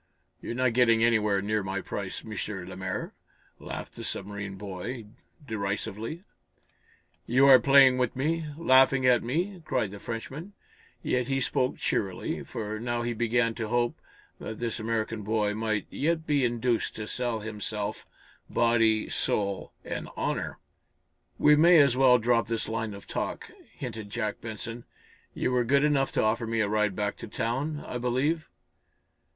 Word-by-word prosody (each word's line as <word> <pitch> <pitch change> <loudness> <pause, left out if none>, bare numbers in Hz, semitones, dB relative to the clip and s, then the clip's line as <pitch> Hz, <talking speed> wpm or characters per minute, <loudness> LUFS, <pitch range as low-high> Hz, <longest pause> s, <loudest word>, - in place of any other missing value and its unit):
"You're 115 - -5
not 130 -1 +2
getting 115 -2 +4
anywhere 105 -4 +3
near 105 +1 0
my 95 0 -3
price, 95 0 -5
M. 110 -1 -7 0.3
lemaire," 95 0 -4 0.5
laughed - - -7
the - - -7
submarine 100 0 -4
boy, 105 +5 -6 0.4
derisively. 110 - -3 1.0
"You 130 +3 +5
are 135 -2 +9
playing 135 -2 +6
with 125 -2 0
me 155 +4 -1
laughing 135 -3 +5
at 125 -2 +5
me!" 175 - -2
cried 130 -9 -1
the 100 - -8
Frenchman, 135 - -6 0.5
yet 125 -1 0
he 135 0 0
spoke 130 0 0
cheerily, 95 -3 -2
for 110 -1 -5
now 120 +1 -2
he 120 0 -1
began 115 +1 +1
to 110 -1 -4
hope 120 +1 +1 0.4
that 110 - -6
this 120 -1 -3
American 110 0 -2
boy 105 0 0
might 110 -1 -1
yet 160 +2 0
be 145 -4 +2
induced 120 -1 0
to 105 - -5
sell 120 -1 -2
himself, 105 -1 -4 0.4
body, 115 -2 +3
soul 100 -2 -1
and - - -5
honor. - - -2 0.8
"We 150 0 +6
may 170 +3 +7
as 140 -5 +5
well 130 -1 +6
drop 115 0 +2
this 115 0 -2
line 110 -2 -3
of 100 - -11
talk," - - -4 0.2
hinted 110 -1 -7
Jack 105 0 -3
Benson. 115 +1 -6 0.5
"You - - 0
were 125 -1 +2
good 140 +4 +3
enough 140 -2 +2
to - - +2
offer 115 +1 +1
me 115 0 -1
a 105 - +2
ride 105 -2 +1
back 105 -1 -2
to - - -8
town, 140 +7 -2
I 125 - -4
believe?" 135 +6 0
115 Hz, 155 wpm, -28 LUFS, 105-130 Hz, 1.0 s, are